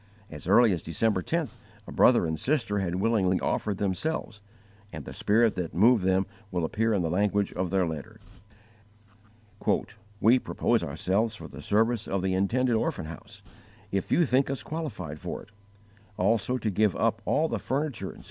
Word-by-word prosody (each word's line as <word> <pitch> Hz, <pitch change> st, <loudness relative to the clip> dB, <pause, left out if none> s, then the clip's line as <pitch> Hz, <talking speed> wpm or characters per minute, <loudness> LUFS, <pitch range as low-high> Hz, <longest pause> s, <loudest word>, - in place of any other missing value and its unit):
As -, -, -9 dB
early 120 Hz, -2 st, +6 dB
as 85 Hz, -4 st, -1 dB
December 95 Hz, +4 st, 0 dB
10th 160 Hz, -, -2 dB, 0.3 s
a -, -, -10 dB
brother -, -, +5 dB
and 80 Hz, -1 st, -2 dB
sister 120 Hz, -, 0 dB
had 90 Hz, -2 st, -2 dB
willingly 95 Hz, -2 st, +2 dB
offered 105 Hz, -3 st, -1 dB
themselves, 105 Hz, -, -2 dB, 0.5 s
and 75 Hz, -3 st, -8 dB
the -, -, -8 dB
spirit 110 Hz, +1 st, +3 dB
that 85 Hz, -3 st, -4 dB
moved 110 Hz, +3 st, +5 dB
them 95 Hz, +1 st, +2 dB, 0.2 s
will 90 Hz, -4 st, -1 dB
appear 115 Hz, +7 st, 0 dB
in 95 Hz, -, 0 dB
the 80 Hz, -, 0 dB
language 100 Hz, +2 st, +1 dB
of 90 Hz, -1 st, -2 dB
their 95 Hz, 0 st, +2 dB
letter: 85 Hz, +8 st, -6 dB, 2.0 s
"We 120 Hz, +6 st, +5 dB
propose -, -, 0 dB
ourselves 110 Hz, +4 st, 0 dB
for -, -, -9 dB
the 70 Hz, +1 st, -10 dB
service 110 Hz, +5 st, +1 dB
of 95 Hz, -1 st, -1 dB
the 95 Hz, -1 st, 0 dB
intended 120 Hz, +7 st, +1 dB
orphan 140 Hz, -, -1 dB
house, 100 Hz, +5 st, -11 dB, 0.5 s
if 95 Hz, -1 st, -2 dB
you 170 Hz, -, +4 dB
think 130 Hz, 0 st, +2 dB
us 135 Hz, -5 st, -3 dB
qualified 115 Hz, -, -5 dB
for -, -, -5 dB
it; -, -, -19 dB, 0.7 s
also 115 Hz, +3 st, +1 dB
to 110 Hz, -3 st, -2 dB
give 105 Hz, 0 st, +2 dB
up 110 Hz, 0 st, 0 dB
all 160 Hz, +2 st, +2 dB
the -, -, -2 dB
furniture, 130 Hz, -8 st, -2 dB
etc. -, -, -11 dB
105 Hz, 175 wpm, -27 LUFS, 95-115 Hz, 2.0 s, early